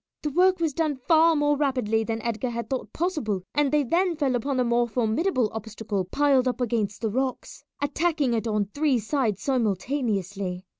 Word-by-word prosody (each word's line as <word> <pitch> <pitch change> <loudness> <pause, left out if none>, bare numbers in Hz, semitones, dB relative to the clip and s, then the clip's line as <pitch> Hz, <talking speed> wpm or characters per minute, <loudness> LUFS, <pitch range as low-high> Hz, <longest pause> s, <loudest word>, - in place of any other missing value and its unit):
The 300 - -1
work 370 +4 +3
was 325 -3 0
done 310 -1 0
far 325 0 +5
more 295 0 +2
rapidly 255 -6 0
than 225 0 -3
Edgar 235 +1 -2
had 235 -1 -4
thought 260 - -3
possible, 295 - -2
and 290 -2 +2
they 300 -1 +3
then 345 +7 +1
fell 285 -4 0
upon 255 +3 -1
the 250 - +3
more 240 0 +2
formidable 245 - 0
obstacle 220 -3 -4
piled 270 +4 +2
up 250 -1 -1
against 220 -4 -1
the 220 -2 -1
rocks, 260 +2 -3 0.2
attacking 295 -2 +1
it 230 0 -1
on 210 -2 +1
three 290 -3 +2
sides 225 -3 -1
simultaneously. 205 -6 -1
255 Hz, 180 wpm, -25 LUFS, 220-295 Hz, 0.2 s, far